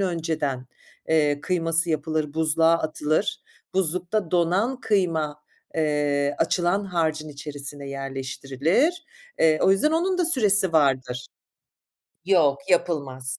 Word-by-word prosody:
önceden, 160 -8 -2 0.4
eee, 150 -2 +2
kıyması 165 -1 0
yapılır, 155 -1 -2
buzluğa 160 +1 +3
atılır. 155 +2 -1 0.3
Buzlukta 180 +1 -1
donan 185 +9 +1
kıyma, 160 -7 0 0.3
eee, 145 -2 0
açılan 180 +3 +1
harcın 160 -4 -1
içerisine 145 -1 -8
yerleştirilir. 135 - -1 0.3
Eee, 155 -1 +4
o - - +5
yüzden 195 +11 +3
onun 365 +3 +1
da 360 - +2
süresi 205 - +2
vardır. 130 -4 +1 1.0
Yok 165 -7 +3
yapılmaz. 135 -7 -1
160 Hz, 105 wpm, -24 LUFS, 145-180 Hz, 1.0 s, o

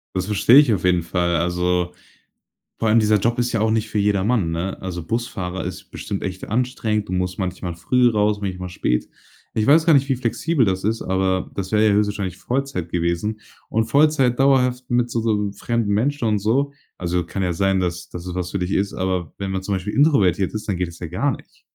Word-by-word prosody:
Das 95 0 -1
verstehe 105 +5 +4
ich 145 -5 +7
auf 95 - -4
jeden 90 -1 +3
Fall. 85 0 0
Also, 90 +1 0 0.9
vor 115 - 0
allem 110 +2 +5
dieser 105 0 +3
Job 120 +4 0
ist 120 0 0
ja 115 - 0
auch 110 - +2
nicht 110 0 0
für 105 - -1
jedermann, 100 -2 +1
ne? 85 +4 -3
Also 90 -3 -5
Busfahrer 95 -6 -3
ist 90 - -7
bestimmt 100 - -5
echt 95 -1 -5
anstrengend, 110 -3 -1
du - - -3
musst 90 +1 -2
manchmal 90 -2 -3
früh 125 +8 +3
raus, 105 -2 +1
manchmal 90 -2 -4
spät. - - -1 0.4
Ich 110 - 0
weiß 160 +3 +6
gar 165 - +5
nicht, 140 -1 +4
wie 135 - +2
flexibel 130 +3 +1
das 95 -1 -1
ist, 110 +3 0
aber 95 0 0
das 95 -1 -4
wäre 110 0 +3
ja - - +4
höchstwahrscheinlich 100 -3 0
Vollzeit 130 -7 -3
gewesen. 85 +6 -1 0.3
Und 110 0 +1
Vollzeit 135 -1 +3
dauerhaft 125 -2 +2
mit 120 0 +1
so 115 -1 -1
so 105 -3 0
fremden 110 0 -1
Menschen 130 +3 0
und 105 -1 +1
so 130 +8 +1 0.3
also 90 -1 -1
kann 95 +3 -3
ja 90 - 0
sein, 95 +2 +1
dass 85 -1 -3
dass 85 0 -8
es 90 -1 -5
was 90 -1 -3
für 100 - -2
dich 90 +1 -2
ist, 100 0 0
aber 90 -3 -2
wenn 100 -1 -4
man 95 0 -2
zum 100 +1 -1
Beispiel 95 +2 -4
introvertiert 100 - +3
ist, 110 0 -5
dann 100 - 0
geht 90 -1 -1
das 85 - -13
ja 85 - -5
gar 115 - 0
nicht. - - -19
100 Hz, 220 wpm, -21 LUFS, 90-115 Hz, 0.9 s, ich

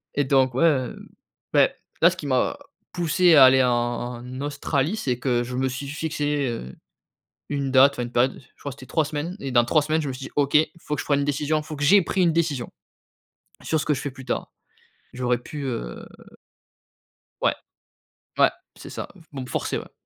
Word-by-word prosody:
Et 145 - +2
donc 130 -1 +3
ouais, 135 - +2
heu, 130 -7 0 0.5
beh, - - +5 0.3
là, 170 - +8
ce 185 - -6
qui 150 - -6
m'a 130 -2 +1 0.3
poussé 175 0 +3
à 135 - +10
aller 130 0 +6
en 125 - +3
en 120 +1 -3
Australie, 145 +5 -1
c'est 125 - -2
que 120 -2 +1
je 125 +1 -6
me 130 +1 0
suis 130 +2 -5
fixé, 150 -2 -1
heu, 65 - -6 0.7
une 140 -2 -2
date, 135 +1 +6
enfin, 125 - -3
une 120 0 -6
période, 125 +2 +2
je 130 - -26
crois, 140 - -5
c'était 130 -1 -12
3 160 -2 +1
semaines 155 +5 -4
et 135 - -4
dans 120 -1 +5
3 150 +6 +3
semaines, 155 +2 0
je 145 - -3
me 135 - -3
suis 130 +1 -7
dit: - - -10
«OK, 145 0 +3 0.2
faut 150 - -4
que - - -3
je - - -5
prenne 145 -1 +2
une 140 - 0
décision. 150 +2 0
Faut 155 0 -7
que 145 - -2
j'ai 195 +6 +6
pris 185 +2 0
une 170 - +4
décision 155 -7 -1 0.9
sur 160 -2 0
ce - - -3
que 150 - +2
je 130 - -4
fais 145 - -4
plus 130 0 -12
tard». - - -3 0.6
J'aurais 125 -1 0
pu 145 +4 -7
heu - - -5 1.4
Ouais. - - +2 0.8
Ouais, - - +5 0.3
c'est - - -10
ça, - - -6
f 165 - -19
pour 135 -2 -6
me - - -6
forcer, - - -2
ouais. - - -9
140 Hz, 215 wpm, -24 LUFS, 130-150 Hz, 1.4 s, à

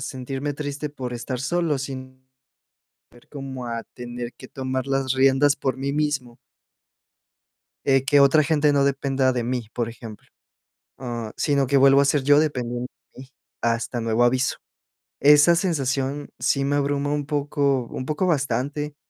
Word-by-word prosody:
sentirme 135 +2 -4
triste 145 +1 -4
por 130 -4 -6
estar 120 +1 -4
solo 165 0 0
sin 130 -1 -8 0.8
ver 120 - -21
cómo 135 -3 -7
a 115 -1 -4
tener 120 0 -7
que - - -13
tomar 130 -1 -3
las 135 -1 0
riendas 135 +2 +4
por 130 -1 -2
mí 140 +1 -2
mismo. 145 -5 -2 1.5
Eh, 135 -1 +3
que 145 +1 +4
otra 140 +3 +5
gente 150 0 +2
no 140 -1 +3
dependa 135 -1 +1
de 125 -1 -1
mí, 120 -2 -3
por 120 -2 -2
ejemplo, 115 -2 -10 0.7
ah, 120 -4 -5
sino 140 -3 +1
que 140 - +3
vuelvo 135 +1 +6
a - - +2
ser 140 -1 +1
yo 145 +1 +5
dependiendo 125 -5 -2 0.3
de - - -14
mí 130 - -13 0.3
hasta 115 +1 -1
nuevo 115 +1 +1
aviso. 130 +2 +2 0.6
Esa 150 +4 +6
sensación 140 -4 -1
sí 135 -1 +1
me 145 +1 +1
abruma 145 0 0
un 145 -1 -1
poco 140 -3 0
un 130 - -6
poco 155 +5 -1
bastante, 145 -1 -1
135 Hz, 155 wpm, -23 LUFS, 125-145 Hz, 1.5 s, vuelvo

